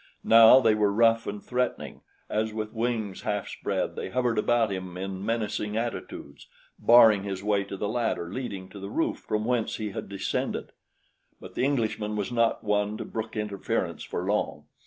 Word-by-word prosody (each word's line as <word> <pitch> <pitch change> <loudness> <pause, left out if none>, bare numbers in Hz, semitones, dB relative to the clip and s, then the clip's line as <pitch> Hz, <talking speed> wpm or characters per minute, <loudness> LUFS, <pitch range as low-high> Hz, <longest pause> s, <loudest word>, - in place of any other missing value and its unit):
Now 115 +3 +8
they 115 -4 +4
were 105 -1 +2
rough 115 +2 +3
and 100 0 -5
threatening, 125 0 -2 0.3
as 110 0 -1
with 110 -1 -4
wings 110 -4 -2
half 105 -1 -2
spread - - -3
they - - -4
hovered 120 -1 0
about 115 -1 +2
him 95 -1 -5
in 95 0 -5
menacing 110 -1 -2
attitudes, 115 -10 -5 0.3
barring 115 -4 +7
his 100 -1 -5
way 100 -1 +1
to 100 0 -7
the 105 - -2
ladder 110 -6 -2
leading 100 -8 -5
to 100 - -10
the 100 0 -6
roof - - -1
from 105 0 -2
whence 120 -2 0
he 105 -2 -4
had - - -6
descended; 100 -1 -3 0.7
but - - -11
the 125 - 0
Englishman 110 -6 -1
was 105 +2 -2
not 115 -1 +1
one 105 0 0
to - - -5
brook 110 0 -5
interference 105 -2 -2
for - - -4
long. - - -1
105 Hz, 180 wpm, -27 LUFS, 100-115 Hz, 0.7 s, Now